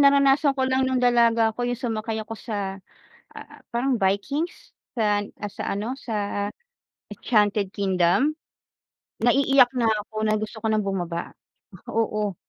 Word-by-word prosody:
naranasan 280 Hz, 0 st, +5 dB
ko 260 Hz, -, +1 dB
lang 260 Hz, 0 st, +2 dB
no'ng 260 Hz, -1 st, +1 dB
dalaga 230 Hz, -2 st, +4 dB
ako 245 Hz, -, -5 dB
yung 245 Hz, -1 st, -2 dB
sumakay 225 Hz, -2 st, -3 dB
ako 225 Hz, +1 st, -7 dB
sa, 200 Hz, -3 st, -5 dB, 0.5 s
ah, -, -, -12 dB
parang 245 Hz, 0 st, 0 dB
Vikings 270 Hz, -, -1 dB, 0.2 s
sa, 210 Hz, -3 st, +2 dB, 0.2 s
ah, 205 Hz, -, -4 dB
sa -, -, -6 dB
ano, 215 Hz, +5 st, -3 dB
sa 205 Hz, -2 st, -2 dB, 0.6 s
Enchanted 205 Hz, -3 st, +1 dB
Kingdom. 195 Hz, -, +2 dB, 0.9 s
Naiiyak 265 Hz, +1 st, +5 dB
na 235 Hz, -2 st, +2 dB, 0.2 s
ako 215 Hz, -, -22 dB
na 215 Hz, -, +2 dB
gusto 215 Hz, +1 st, -4 dB
ko 220 Hz, -, -2 dB
nang 215 Hz, -1 st, +1 dB
bumaba. 175 Hz, -3 st, -3 dB, 0.6 s
Oo, 210 Hz, -3 st, -1 dB
225 Hz, 140 wpm, -24 LUFS, 205-255 Hz, 0.9 s, naranasan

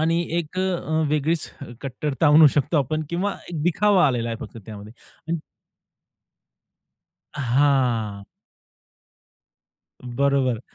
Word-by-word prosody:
आणि 165 Hz, +2 st, +2 dB, 0.2 s
एक 170 Hz, +2 st, -5 dB
अ, -, -, +2 dB
अ, 170 Hz, -4 st, -1 dB
वेगळीच 155 Hz, +2 st, -1 dB, 0.3 s
कट्टरता 140 Hz, +3 st, -2 dB
आणू 150 Hz, +1 st, +8 dB
शकतो 145 Hz, +3 st, 0 dB
आपण 155 Hz, +3 st, -1 dB
किंवा 190 Hz, +4 st, -1 dB, 0.2 s
एक 160 Hz, -4 st, -4 dB
दिखावा 185 Hz, 0 st, +3 dB
आलेला 120 Hz, -3 st, -1 dB
आहे 115 Hz, -, -3 dB
फक्त 115 Hz, -, -9 dB
त्यामध्ये. 105 Hz, 0 st, -10 dB, 0.4 s
अन 170 Hz, -, 0 dB, 2.0 s
हां. 125 Hz, -6 st, +1 dB, 1.8 s
बरोबर. 130 Hz, -1 st, 0 dB
145 Hz, 105 wpm, -23 LUFS, 125-165 Hz, 2.0 s, आणू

